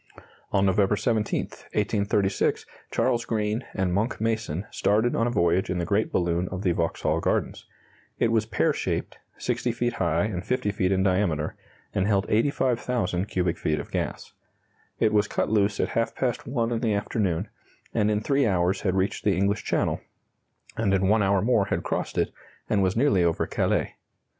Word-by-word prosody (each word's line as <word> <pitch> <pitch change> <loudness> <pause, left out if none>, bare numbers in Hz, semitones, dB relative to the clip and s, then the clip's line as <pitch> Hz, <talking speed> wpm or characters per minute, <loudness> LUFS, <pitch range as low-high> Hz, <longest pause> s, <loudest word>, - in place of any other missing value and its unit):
On 100 0 +3
November 100 +1 +3
17, 110 -1 0
1836, 100 -2 -1 0.2
Charles 120 -2 +1
Green 110 +1 -1
and 95 -2 0
Monck 105 +6 0
Mason 110 -5 -1
started 110 +4 +2
on 115 - +2
a - - +1
voyage 90 -4 +2
in 90 - -1
the 85 - -1
great 100 +5 +1
balloon 85 0 0
of 95 +1 -5
the 90 - +3
Vauxhall 85 -1 0
Gardens. - - -1 0.5
It 115 - +2
was 110 -1 +1
pear - - +1
shaped, - - -3 0.2
60 120 - -1
feet 120 +1 -1
high 85 -1 +1
and 95 -4 -3
50 125 -1 0
feet 95 -2 0
in 95 0 +2
diameter, 90 -6 +1 0.4
and 95 - +1
held 100 -1 +2
85,000 120 -6 +1
cubic 90 -4 -1
feet 75 - 0
of - - -8
gas. - - -3 0.7
It 110 - +3
was 105 0 +3
cut - - -1
loose 105 -1 +2
at - - +1
half 115 0 -1
past 125 -3 -2
one 120 -2 0
in 115 - 0
the 110 -3 +1
afternoon, 100 -4 -1 0.4
and 105 - +2
in 105 0 +1
3 140 +1 +2
hours 95 0 +1
had 95 -2 0
reached 95 +1 0
the 100 -3 +2
English 100 +2 +1
Channel, - - 0 0.7
and 100 -3 +1
in 95 0 +2
1 110 +1 +4
hour 100 0 +2
more 110 -4 +3
had - - -2
crossed - - -3
it, - - +1 0.4
and 105 - +2
was 95 +2 +1
nearly 120 -9 +3
over 85 -1 +1
Calais. - - 0
105 Hz, 180 wpm, -26 LUFS, 95-115 Hz, 0.7 s, 1